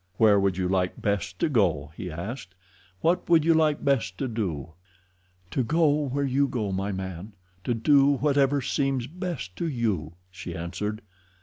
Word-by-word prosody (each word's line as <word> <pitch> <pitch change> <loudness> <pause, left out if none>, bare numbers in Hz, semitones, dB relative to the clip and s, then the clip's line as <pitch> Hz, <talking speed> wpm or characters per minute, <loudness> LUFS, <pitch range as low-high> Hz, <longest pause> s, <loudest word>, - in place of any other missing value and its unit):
"Where 105 -2 +5
would 95 -2 +1
you 90 -1 0
like 90 -1 0
best 100 -1 -1
to 170 - +1
go?" 85 - +1
he 90 - -6
asked. 95 +4 -6 0.5
"What 175 +2 +1
would 165 -3 +5
you 165 - +5
like 155 -2 +2
best 115 -10 +1
to 135 - -2
do?" 85 - -3 0.8
"To 130 - 0
go 150 +1 +2
where 140 +2 -1
you 140 +1 +2
go, 110 -7 -2
my 95 +2 -2
man; 95 +1 -6 0.3
to 120 - +1
do 140 +4 +4
whatever 140 -1 +2
seems 135 -2 0
best 170 - -5
to 170 - -1
you," 105 - -1 0.2
she 90 -2 -7
answered. 100 +6 -4
115 Hz, 170 wpm, -26 LUFS, 95-140 Hz, 0.8 s, Where